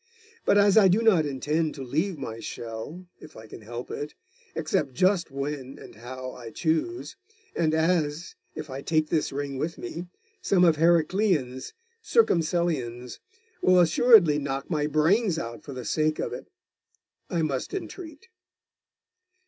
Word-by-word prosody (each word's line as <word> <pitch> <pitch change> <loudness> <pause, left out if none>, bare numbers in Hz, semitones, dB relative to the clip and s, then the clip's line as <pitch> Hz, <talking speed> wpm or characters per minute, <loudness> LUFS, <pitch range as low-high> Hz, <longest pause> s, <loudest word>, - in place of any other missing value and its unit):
But 205 - +4
as 205 +1 +6
I 200 - +6
do 200 +5 +3
not 180 -9 +4
intend 150 +3 -1
to 135 - -6
leave 160 +8 -1
my 115 -5 -6
shell, 115 +12 -7
if 155 - -13
I 110 - -11
can 110 - -11
help 120 +3 -7
it, 145 +1 -5 0.4
except 130 - -1
just 185 +2 +2
when 140 -1 -5
and - - -12
how 130 +3 -8
I 120 -2 -9
choose, 165 - -2 0.4
and 160 -2 +1
as, 160 -1 0 0.2
if 155 - -6
I 135 0 -6
take 155 0 0
this 160 -2 0
ring 140 -1 -4
with 165 +3 -3
me, 170 +9 -6 0.3
some 180 -2 +3
of 165 -3 +4
Heraclian's 165 -5 +1 0.3
Circumcellions 160 - 0 0.4
will 185 0 +5
assuredly 175 -2 +6
knock 140 +2 -4
my 150 -2 +1
brains 165 +6 +2
out 115 -7 -5
for 140 - -9
the 125 -2 -7
sake 155 +6 +1
of - - -3
it - - -8 0.8
I 170 -2 0
must 140 -4 -2
entreat. 360 -2 -7
155 Hz, 150 wpm, -26 LUFS, 135-180 Hz, 0.8 s, as